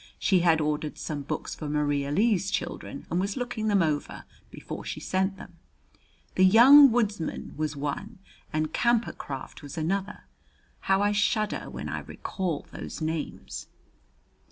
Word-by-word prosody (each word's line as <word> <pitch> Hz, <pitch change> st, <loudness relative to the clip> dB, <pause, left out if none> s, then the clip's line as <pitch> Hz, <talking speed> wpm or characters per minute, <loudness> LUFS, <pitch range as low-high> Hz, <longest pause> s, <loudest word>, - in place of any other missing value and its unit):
She 190 Hz, -, +3 dB
had 170 Hz, -2 st, +4 dB
ordered 150 Hz, 0 st, -2 dB
some 150 Hz, -3 st, -4 dB
books 140 Hz, -, -4 dB
for 150 Hz, -, -6 dB
Maria 145 Hz, -1 st, 0 dB
Lee's 195 Hz, +3 st, +2 dB
children -, -, -4 dB
and 175 Hz, -, +1 dB
was 195 Hz, +4 st, -2 dB
looking 240 Hz, -3 st, -2 dB
them 200 Hz, -4 st, +4 dB
over 150 Hz, -2 st, -2 dB, 0.3 s
before -, -, -8 dB
she -, -, -5 dB
sent 190 Hz, +1 st, -1 dB
them. 175 Hz, -3 st, -13 dB, 0.7 s
The 185 Hz, -, +3 dB
"Young 255 Hz, +8 st, +9 dB
Woods 215 Hz, -4 st, +1 dB
man" 160 Hz, -, -5 dB
was 155 Hz, -1 st, -2 dB
one 150 Hz, +10 st, -4 dB, 0.3 s
and 155 Hz, 0 st, -1 dB
"Camper 235 Hz, -1 st, +2 dB
Craft" 135 Hz, +1 st, -7 dB
was 145 Hz, +2 st, -9 dB
another. 195 Hz, +6 st, -2 dB, 0.6 s
How 195 Hz, +1 st, +2 dB
I 205 Hz, -, +3 dB
shudder 210 Hz, +1 st, 0 dB
when -, -, -6 dB
I -, -, -3 dB
recall 175 Hz, -6 st, -4 dB
those -, -, -7 dB
names! 160 Hz, 0 st, -4 dB
185 Hz, 155 wpm, -27 LUFS, 155-210 Hz, 0.7 s, Young